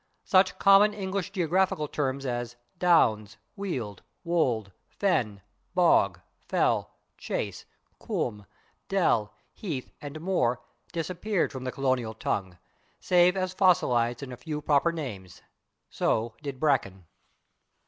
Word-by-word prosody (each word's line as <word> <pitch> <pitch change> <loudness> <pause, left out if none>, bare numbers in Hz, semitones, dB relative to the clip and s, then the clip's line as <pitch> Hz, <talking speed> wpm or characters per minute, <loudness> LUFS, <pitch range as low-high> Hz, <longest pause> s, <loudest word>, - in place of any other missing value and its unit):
Such 185 -1 +3
common 200 +2 +6
English 190 -2 -3
geographical 180 -3 +1
terms 135 -2 -2
as 120 -1 -3 0.2
/downs/, 110 - +3 0.2
/weald/, 125 - -4 0.3
/wold/, 125 - +1 0.3
/fen/, 110 - +1 0.4
/bog/, 100 - +4 0.3
/fell/, - - +2 0.3
/chase/, - - -4 0.3
/combe/, 105 -4 -3 0.4
/dell/, 140 - +2 0.3
/heath/ 155 -11 -5
and 145 0 -7
/moor/ 155 -8 0 0.3
disappeared 180 +4 -1
from 130 -2 -7
the 130 - -2
colonial 130 -5 -1
tongue, 95 -4 -3 0.4
save 180 +1 +4
as 185 -1 -1
fossilized 125 - +2
in 130 - -7
a 125 - -7
few 150 +4 -5
proper 150 +2 +2
names. 105 - -7 0.5
So 115 +1 0
did 140 -3 -6
/bracken 100 -11 +1
140 Hz, 115 wpm, -28 LUFS, 120-180 Hz, 0.5 s, common